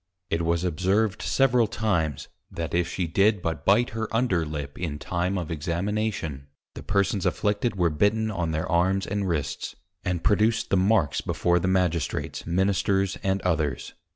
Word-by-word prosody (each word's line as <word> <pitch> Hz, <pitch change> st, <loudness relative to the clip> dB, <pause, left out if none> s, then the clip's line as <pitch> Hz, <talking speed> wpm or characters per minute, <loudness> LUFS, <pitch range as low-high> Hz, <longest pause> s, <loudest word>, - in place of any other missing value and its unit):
It 80 Hz, -, +1 dB
was 85 Hz, +1 st, 0 dB
observed 95 Hz, +4 st, +1 dB
several 125 Hz, -4 st, +3 dB
times, 85 Hz, -, -1 dB, 0.2 s
that 85 Hz, -1 st, -5 dB
if 85 Hz, 0 st, +2 dB
she 90 Hz, 0 st, -2 dB
did 100 Hz, +5 st, +3 dB
but 85 Hz, -2 st, -3 dB
bite 110 Hz, +5 st, +4 dB
her 110 Hz, 0 st, -3 dB
under 110 Hz, -9 st, +1 dB
lip 75 Hz, -2 st, -6 dB
in 80 Hz, -5 st, -3 dB
time 90 Hz, +5 st, -2 dB
of 85 Hz, -3 st, -4 dB
Examination, 85 Hz, -2 st, -2 dB, 0.3 s
the -, -, -8 dB
Persons 100 Hz, 0 st, 0 dB
afflicted 105 Hz, +3 st, 0 dB
were 90 Hz, -3 st, +2 dB
bitten 110 Hz, +7 st, +1 dB
on 90 Hz, -5 st, -2 dB
their 80 Hz, 0 st, -2 dB
Arms 95 Hz, +2 st, +2 dB
and 100 Hz, -1 st, -2 dB
Wrists, 75 Hz, -5 st, -3 dB, 0.3 s
and 90 Hz, -2 st, -2 dB
produced 110 Hz, +2 st, +2 dB
the -, -, +4 dB
Marks 95 Hz, -5 st, +2 dB
before 90 Hz, 0 st, +1 dB
the 90 Hz, -, -1 dB
Magistrates, 90 Hz, -4 st, -1 dB
Ministers, 95 Hz, +1 st, +1 dB
and 95 Hz, 0 st, 0 dB
others. 80 Hz, -7 st, -1 dB
90 Hz, 160 wpm, -26 LUFS, 85-105 Hz, 0.3 s, bite